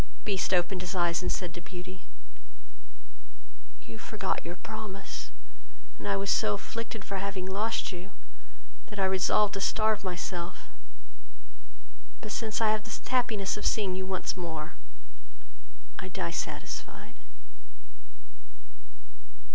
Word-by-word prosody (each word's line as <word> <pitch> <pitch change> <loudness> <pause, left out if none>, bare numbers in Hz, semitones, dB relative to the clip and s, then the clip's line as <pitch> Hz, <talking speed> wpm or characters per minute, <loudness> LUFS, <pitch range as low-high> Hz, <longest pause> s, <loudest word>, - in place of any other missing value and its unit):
Beast 195 -3 +2
opened 180 0 +3
his 185 +2 -2
eyes, 175 -1 +4
and 180 - +1
said 180 -3 -1
to 175 - -6
Beauty, 185 +1 -7 1.8
"You 115 -1 -9
forgot 195 - -1
your 170 +1 -4
promise, 200 -6 -5 0.7
and 105 - -4
I 100 -1 +3
was 100 0 +2
so 105 - +4
afflicted 225 - -4
for 195 - -2
having 195 -1 -1
lost 210 +5 +1
you, 180 +1 -6 0.8
that 210 - -8
I 195 - +4
resolved 190 +2 +4
to 195 - -1
starve 215 +1 +3
myself; 180 -1 -3 1.5
but 215 - -5
since 220 0 0
I 220 -1 +6
have 215 -1 +2
the 230 - -5
happiness 220 -6 +3
of 205 - -4
seeing 200 -4 +3
you 190 0 -2
once 190 -1 0
more, 165 -2 -3 1.3
I 185 - -3
die 170 - -1
satisfied." - - -4
190 Hz, 125 wpm, -31 LUFS, 175-210 Hz, 1.8 s, I